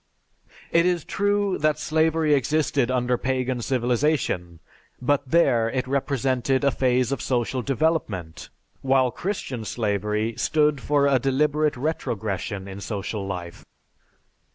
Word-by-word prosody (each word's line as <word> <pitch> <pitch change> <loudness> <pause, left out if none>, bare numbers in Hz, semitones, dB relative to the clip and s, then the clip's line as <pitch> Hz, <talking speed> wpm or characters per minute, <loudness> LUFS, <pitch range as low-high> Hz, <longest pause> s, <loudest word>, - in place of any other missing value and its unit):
It 170 +1 +4
is 175 -3 0
true 205 -1 0
that 155 0 +2
slavery 160 0 +2
existed 145 -2 +1
under 125 -1 0
Pagan 130 -1 -1
civilization, 120 - 0 0.4
but 140 +1 0
there 125 -8 +3
it 130 +2 -2
represented 135 -1 0
a 140 - +4
phase 125 -1 +1
of 140 - -2
social 125 0 -1
development, 120 - -2 0.3
while 130 -2 +3
Christian 140 - -4
slavery 105 0 -1
stood 150 -3 +2
for 145 0 +2
a 140 -2 +3
deliberate 145 +2 +1
retrogression 105 - -3
in 100 +1 -8
social 100 -1 -4
life. 90 -3 -6
130 Hz, 120 wpm, -24 LUFS, 115-150 Hz, 0.4 s, It